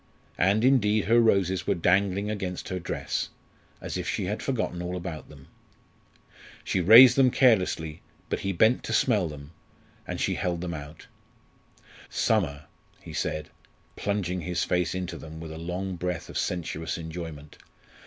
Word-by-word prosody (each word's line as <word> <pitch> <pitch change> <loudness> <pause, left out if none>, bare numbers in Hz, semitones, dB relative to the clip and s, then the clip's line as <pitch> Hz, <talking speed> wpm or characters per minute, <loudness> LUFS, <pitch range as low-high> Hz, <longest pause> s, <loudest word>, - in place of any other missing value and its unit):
And 100 +5 +3
indeed 110 -6 +3
her 115 +3 +4
roses 95 -5 +2
were - - +2
dangling 100 +4 +1
against 95 -4 -4
her 95 - -3
dress, - - -3 0.5
as - - -5
if - - -3
she - - -2
had 105 +4 -3
forgotten 110 -9 -2
all 90 +1 -3
about 85 -3 -7
them. 70 -3 -15 1.2
She 95 - 0
raised 115 +7 +9
them 135 -2 +5
carelessly, 90 - +2 0.3
but - - -2
he 95 - -2
bent 110 +7 +3
to 115 - -3
smell 100 -5 +2
them, 75 -1 -10 0.6
and - - -4
she - - 0
held 85 -2 -2
them 90 -1 -4
out. 75 0 -9 1.0
"Summer!" 75 -10 0 0.3
he - - -11
said, 75 -1 -3 0.4
plunging 90 -3 -2
his 90 +2 -1
face 90 -1 0
into 90 -2 -4
them 80 0 -9
with 80 -1 -8
a 80 - -7
long 90 +2 -4
breath 90 0 -4
of - - -10
sensuous 80 -2 -3
enjoyment. 80 -3 -8
90 Hz, 155 wpm, -27 LUFS, 80-100 Hz, 1.2 s, raised